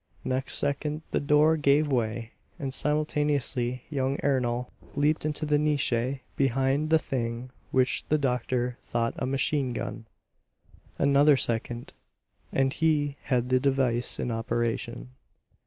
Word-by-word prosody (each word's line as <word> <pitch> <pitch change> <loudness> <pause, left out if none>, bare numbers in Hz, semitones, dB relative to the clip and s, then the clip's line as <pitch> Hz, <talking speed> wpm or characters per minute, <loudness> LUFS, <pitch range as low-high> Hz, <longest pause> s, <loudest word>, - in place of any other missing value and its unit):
Next 130 +1 -1
second 150 +2 -2
the - - +1
door 150 +2 +4
gave 145 0 +3
way, 115 -2 -1 0.3
and 135 -2 -4
simultaneously 145 -5 0
young 135 -1 0
Ernol 125 -3 0 0.2
leaped 150 +2 +1
into 155 +1 -2
the 150 -1 +2
niche 150 -4 +1 0.4
behind 135 +3 +1
the 160 - +6
thing 120 -3 -3 0.2
which 130 -1 +2
the 155 - +4
doctor 125 -2 -1
thought 115 0 -1
a - - -1
machine 135 -1 0
gun. 115 -1 -5 0.9
Another 140 +1 +5
second, 120 0 -1 0.6
and 135 0 +1
he 150 -3 +1
had 125 -2 0
the 130 0 +4
device 130 -3 +1
in 120 - -1
operation. 120 +1 -2
135 Hz, 125 wpm, -27 LUFS, 120-145 Hz, 0.9 s, the